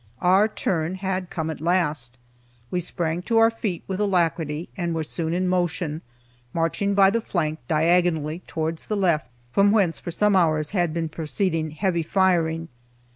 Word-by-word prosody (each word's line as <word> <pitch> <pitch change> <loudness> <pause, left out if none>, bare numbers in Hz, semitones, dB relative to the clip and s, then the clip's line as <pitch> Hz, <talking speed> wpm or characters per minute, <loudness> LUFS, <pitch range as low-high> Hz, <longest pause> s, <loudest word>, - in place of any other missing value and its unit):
Our 190 +4 +5
turn 180 -5 -1
had 190 -1 -3
come 160 -1 -3
at 155 - -8
last. 150 -8 0 0.5
We 180 - 0
sprang 170 -1 -2
to 225 +5 0
our 225 0 +6
feet 210 -6 -4
with 190 0 -4
alacrity, 170 -5 0
and 170 -3 -2
were 160 - -1
soon 160 +1 -3
in 180 +2 0
motion, 175 -3 -1 0.5
marching 185 +5 0
by 195 -1 +6
the 230 +2 0
flank 155 -6 -2
diagonally 160 -1 +2
towards 160 0 -3
the 210 - -1
left, 170 - +1 0.2
from 200 +6 +4
whence, 195 -7 +2
for - - -7
some 205 +4 +2
hours, 155 -4 +2
had 175 -5 +1
been 165 0 -2
proceeding 160 +1 -1
heavy 170 +2 -1
firing. 165 -2 +1
170 Hz, 165 wpm, -24 LUFS, 160-190 Hz, 0.5 s, our